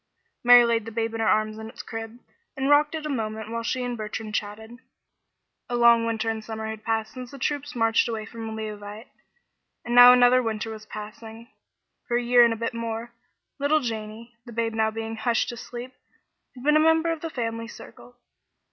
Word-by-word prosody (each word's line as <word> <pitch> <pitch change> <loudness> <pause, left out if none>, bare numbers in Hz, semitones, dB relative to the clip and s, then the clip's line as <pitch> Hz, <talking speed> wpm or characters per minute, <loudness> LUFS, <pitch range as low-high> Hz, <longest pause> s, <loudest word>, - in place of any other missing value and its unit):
Mary 245 0 +8
laid 230 -2 0
the 225 - -7
babe 225 0 -2
in 225 - -4
her 225 - +1
arms 215 0 +1
in 220 0 -7
its - - -10
crib, 225 +1 -7 0.4
and 270 +2 +1
rocked 295 +2 +4
it 310 -1 -5
a - - -1
moment 220 -5 -4
while 230 0 -2
she 250 +2 -2
and 245 -1 -3
Bertrand 215 0 -6
chatted. 220 +3 -5 0.9
A 245 - -1
long 235 -1 +5
winter 225 0 -2
and 220 -1 -2
summer 220 0 -6
had 220 0 -6
passed 220 -1 -2
since 255 -1 -8
the 275 - -11
troops 290 +1 -3
marched 225 0 +2
away 220 -2 -4
from 225 -1 -7
Leauvite, 215 +1 -7 0.8
and 240 - -3
now 245 0 +10
another 250 0 +5
winter 225 -1 -3
was 215 -1 -10
passing. 220 +2 -9 0.6
For 240 - +1
a 245 - -1
year 240 0 +6
and 235 - +4
a 225 - -2
bit 230 +2 -3
more, 230 0 -5 0.5
little 290 +2 +3
Janey, 225 -1 -6
the 240 - -11
babe 230 0 -1
now 220 0 +1
being 225 0 -5
hushed 230 +1 0
to 240 - -6
sleep, 245 +2 -8 0.6
had 250 - -11
been 300 +2 +4
a - - +5
member 320 +1 +3
of 325 -2 -4
the 330 - -4
family 230 -4 -4
circle. 245 +1 -13
230 Hz, 205 wpm, -25 LUFS, 220-245 Hz, 0.9 s, now